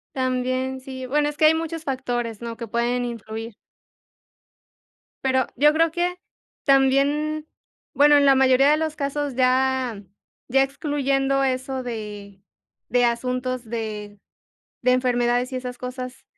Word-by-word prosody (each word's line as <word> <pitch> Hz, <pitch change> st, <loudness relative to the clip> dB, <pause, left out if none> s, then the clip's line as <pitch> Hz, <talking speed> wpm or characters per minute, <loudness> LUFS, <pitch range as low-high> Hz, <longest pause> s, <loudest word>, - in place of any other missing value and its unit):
También, 255 Hz, 0 st, -1 dB
sí, 260 Hz, 0 st, -7 dB
bueno, 295 Hz, +2 st, +1 dB
es 295 Hz, -, -4 dB
que 310 Hz, -, -2 dB
hay 310 Hz, -, +7 dB
muchos 325 Hz, 0 st, -4 dB
factores, 245 Hz, -5 st, -3 dB
¿no?, 235 Hz, -1 st, -5 dB
que 230 Hz, 0 st, -7 dB
pueden 240 Hz, +2 st, 0 dB
influir. 225 Hz, -1 st, -6 dB, 1.7 s
Pero, 260 Hz, -1 st, +2 dB
yo 295 Hz, +4 st, +5 dB
creo 330 Hz, +1 st, +3 dB
que 355 Hz, +2 st, -1 dB, 0.5 s
también 285 Hz, +3 st, +2 dB, 0.5 s
bueno, 290 Hz, +1 st, +6 dB
en 285 Hz, -, +4 dB
la 275 Hz, -1 st, +6 dB
mayoría 265 Hz, +1 st, +5 dB
de 305 Hz, -, +4 dB
los 315 Hz, -1 st, -2 dB
casos 285 Hz, -2 st, -2 dB
ya 255 Hz, -3 st, +1 dB, 0.5 s
ya 270 Hz, +2 st, +4 dB
excluyendo 275 Hz, -1 st, 0 dB
eso 260 Hz, 0 st, -1 dB
de 210 Hz, -4 st, -7 dB, 0.5 s
de 245 Hz, 0 st, +3 dB
asuntos 250 Hz, +1 st, -1 dB
de 215 Hz, -3 st, -5 dB, 0.6 s
de 250 Hz, -, +4 dB
enfermedades 245 Hz, 0 st, +1 dB
y 255 Hz, -, -2 dB
esas 250 Hz, -1 st, -6 dB
cosas, 255 Hz, 0 st, -7 dB
260 Hz, 135 wpm, -23 LUFS, 245-280 Hz, 1.7 s, hay